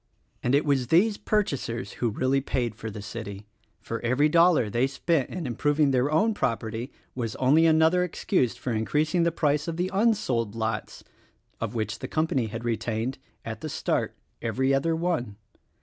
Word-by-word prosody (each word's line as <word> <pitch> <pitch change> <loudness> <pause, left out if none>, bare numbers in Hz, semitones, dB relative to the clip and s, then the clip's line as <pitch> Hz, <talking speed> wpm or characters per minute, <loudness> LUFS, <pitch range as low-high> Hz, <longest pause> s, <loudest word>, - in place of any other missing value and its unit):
And 125 +3 +2
it 145 - +2
was 135 -4 +1
these 205 - +4
purchasers 140 - -1
who 120 - +2
really 130 +5 +1
paid 120 -4 -1
for 110 +1 -7
the 105 -1 -8
city; 105 -2 -7 0.3
for 115 - -5
every 130 +6 +2
dollar 165 -6 +5
they 120 +5 +1
spent 140 +2 0
in 180 -3 -5
improving 145 +4 +1
their 130 +2 +2
own 215 +9 +3
property 115 - -2 0.2
was 115 -4 -3
only 150 +6 +4
another 160 +3 +4
excuse 175 - 0
for 125 - -4
increasing 150 - +1
the 170 0 +3
price 150 -2 0
of 165 -1 -3
the 180 +1 -1
unsold 190 - +1
lots, 110 0 -3 0.6
of 115 +1 -4
which 110 0 -2
the - - -5
company 155 -7 0
had 115 +2 -6
retained 115 +2 -2
— - - -38
at 110 -1 -6
the 155 - -4
start - - -1 0.2
— - - -45
every 130 +4 +1
other 160 +4 +1
one. 160 - -1
130 Hz, 180 wpm, -26 LUFS, 115-160 Hz, 0.6 s, dollar